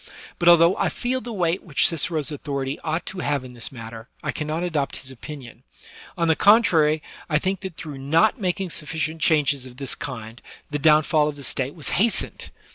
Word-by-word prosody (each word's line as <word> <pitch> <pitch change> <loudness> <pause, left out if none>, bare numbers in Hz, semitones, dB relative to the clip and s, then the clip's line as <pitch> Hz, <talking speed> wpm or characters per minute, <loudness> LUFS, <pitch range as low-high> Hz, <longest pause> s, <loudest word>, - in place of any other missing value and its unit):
But 175 - +5
although 170 +1 +7
I - - +1
feel 255 +1 -2
the 235 - -7
weight 180 -3 0
which 150 -7 +1
Cicero's 160 -3 -1
authority 140 -1 -3
ought 160 +2 -2
to 190 - -5
have 145 -5 -1
in 125 -1 -10
this 120 -1 -6
matter, 115 -1 -9
I - - -1
cannot 155 +3 -3
adopt 155 -6 -1
his 130 0 -7
opinion; 130 -1 -10 0.6
on 170 - +1
the 160 - +4
con 215 +7 +6
trary, 155 -5 +3 0.3
I 150 - +3
think 190 +4 -1
that 190 -4 -7
through 145 -4 -7
not 165 - +2
making 185 -1 -1
sufficient 155 +1 -3
changes 145 -4 +2
of 125 -1 -14
this 135 -2 -3
kind, 115 -3 -7 0.3
the 145 - -1
downfall 150 0 +4
of 150 - -3
the 140 - -6
State 130 +3 -2
was 155 - -4
hastened. 230 0 0
155 Hz, 200 wpm, -23 LUFS, 140-170 Hz, 0.6 s, although